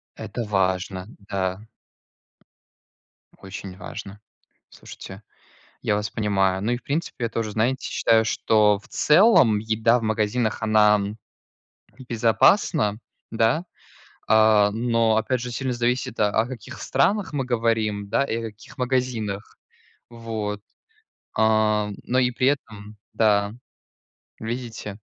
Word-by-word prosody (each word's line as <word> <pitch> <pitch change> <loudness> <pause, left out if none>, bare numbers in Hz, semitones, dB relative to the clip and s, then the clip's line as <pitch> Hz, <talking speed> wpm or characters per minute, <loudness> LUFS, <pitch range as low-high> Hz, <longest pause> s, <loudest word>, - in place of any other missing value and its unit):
Это 120 - -5
важно, 95 -1 -1 0.2
да. 95 +2 -3 1.7
Очень 95 -1 -9
важно. 105 -2 -8 0.5
Слушайте, 95 +2 -11 0.6
я 105 - +1
вас 105 0 -2
понимаю. 95 -3 0
Ну, 115 +4 -1
и, 120 - 0
в - - -17
принципе, 140 -5 -3
я - - -2
тоже, 115 -2 -3
знаете, 120 +5 0
считаю, 110 -1 +2
что, 105 -2 +3
в 125 - -20
целом, 150 - +5
еда 110 +2 +2
в - - -8
магазинах, 110 +1 0
она 105 -1 +4 1.1
безопасна, 115 - +3 0.3
да. 115 +9 +1 0.6
А, 110 -1 +5
но, 115 -1 +1
опять 120 +3 0
же, 125 0 -5
сильно 130 +2 -2
зависит, 120 0 -1
о 105 - +4
о 110 +3 +1
каких 125 -4 -9
странах 200 -4 +1
мы 135 -3 -1
говорим, 110 -4 0
да, 140 - +1
и 115 - -2
о 115 - -3
каких 110 +6 -17
магазинах, 125 -5 -2 0.5
вот, 110 -3 -5 0.8
а. 110 -1 +2
Но 130 +1 0
и 125 -1 +3
при 130 +2 +2
этом 105 -6 -4 0.2
да, 105 -2 +2 0.9
видите? 110 -3 -6
110 Hz, 120 wpm, -23 LUFS, 105-120 Hz, 1.7 s, целом